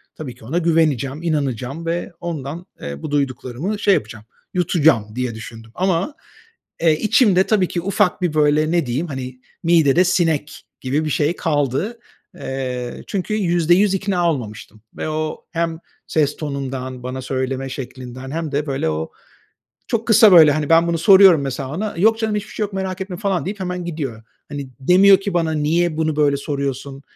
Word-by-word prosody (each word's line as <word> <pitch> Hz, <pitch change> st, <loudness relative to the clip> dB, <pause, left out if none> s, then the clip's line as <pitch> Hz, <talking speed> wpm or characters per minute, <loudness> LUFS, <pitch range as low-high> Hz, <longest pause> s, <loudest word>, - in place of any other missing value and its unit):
Tabii 130 Hz, -6 st, -7 dB
ki 120 Hz, -, -16 dB
ona 150 Hz, +9 st, -2 dB
güveneceğim, 155 Hz, -4 st, +1 dB
inanacağım 140 Hz, -1 st, -2 dB
ve 170 Hz, +2 st, -2 dB
ondan, 165 Hz, 0 st, -5 dB, 0.2 s
eee, 70 Hz, 0 st, -6 dB
bu -, -, -5 dB
duyduklarımı 140 Hz, -, -2 dB
şey 200 Hz, -1 st, +4 dB
yapacağım, 110 Hz, -, -3 dB, 0.3 s
yutacağım, 155 Hz, -, +2 dB
diye 125 Hz, -2 st, -2 dB
düşündüm. 115 Hz, 0 st, -10 dB
Ama, 185 Hz, -, 0 dB, 0.7 s
eee, 165 Hz, -2 st, +4 dB
içimde 205 Hz, -4 st, +4 dB
tabii 195 Hz, -3 st, +2 dB
ki, 175 Hz, -, -3 dB
ufak 195 Hz, 0 st, +1 dB
bir 175 Hz, -4 st, 0 dB
böyle, 155 Hz, +1 st, +2 dB
ne 170 Hz, -3 st, +1 dB
diyeyim, 130 Hz, +8 st, -2 dB
hani, 130 Hz, -3 st, -7 dB, 0.2 s
"midede 165 Hz, -1 st, +4 dB
sinek" 165 Hz, -4 st, 0 dB, 0.2 s
gibi 140 Hz, +4 st, -1 dB
bir -, -, -1 dB
şey 150 Hz, +3 st, +1 dB
kaldı. 150 Hz, -, -1 dB, 0.4 s
Eee, 130 Hz, -5 st, -5 dB
çünkü 200 Hz, +1 st, -3 dB
%100 175 Hz, 0 st, +3 dB
ikna 185 Hz, -3 st, +1 dB
olmamıştım 110 Hz, -4 st, -7 dB, 0.2 s
ve -, -, -3 dB
o 155 Hz, 0 st, -4 dB
hem 165 Hz, -1 st, -2 dB, 0.3 s
ses 150 Hz, -2 st, +1 dB
tonundan, 130 Hz, -3 st, -5 dB
bana 130 Hz, +1 st, -5 dB
söyleme 130 Hz, +1 st, -3 dB
şeklinden 130 Hz, 0 st, -8 dB
hem 160 Hz, -1 st, -3 dB
de, 145 Hz, +1 st, -1 dB
böyle, 135 Hz, -, -1 dB
o 80 Hz, +1 st, -3 dB, 0.8 s
çok 230 Hz, -1 st, -2 dB
kısa, 220 Hz, -2 st, +7 dB
böyle, 160 Hz, -4 st, +8 dB
hani, 150 Hz, 0 st, -1 dB
ben 165 Hz, +1 st, +5 dB
bunu 170 Hz, -1 st, 0 dB
soruyorum 190 Hz, -2 st, +7 dB
mesela, 135 Hz, -1 st, -4 dB
ona, 210 Hz, +4 st, -3 dB
“Yok 220 Hz, +5 st, +3 dB
canım, 220 Hz, -2 st, -1 dB
hiçbir 210 Hz, 0 st, -5 dB
şey 215 Hz, -, -2 dB
yok, 205 Hz, -1 st, -5 dB
merak 190 Hz, 0 st, -3 dB
etme" 190 Hz, -2 st, -5 dB
falan 195 Hz, -2 st, -1 dB
deyip 200 Hz, +2 st, -5 dB
hemen 180 Hz, -1 st, -4 dB
gidiyor. 140 Hz, -10 st, -5 dB, 0.3 s
Hani, 140 Hz, -2 st, -6 dB
demiyor 190 Hz, +7 st, +6 dB
ki 195 Hz, 0 st, -4 dB
"Bana 165 Hz, -2 st, +1 dB
niye 155 Hz, +2 st, 0 dB
bunu 160 Hz, -1 st, 0 dB
böyle 145 Hz, -2 st, +2 dB
soruyorsun?" 140 Hz, -1 st, -4 dB
155 Hz, 170 wpm, -20 LUFS, 135-180 Hz, 0.8 s, böyle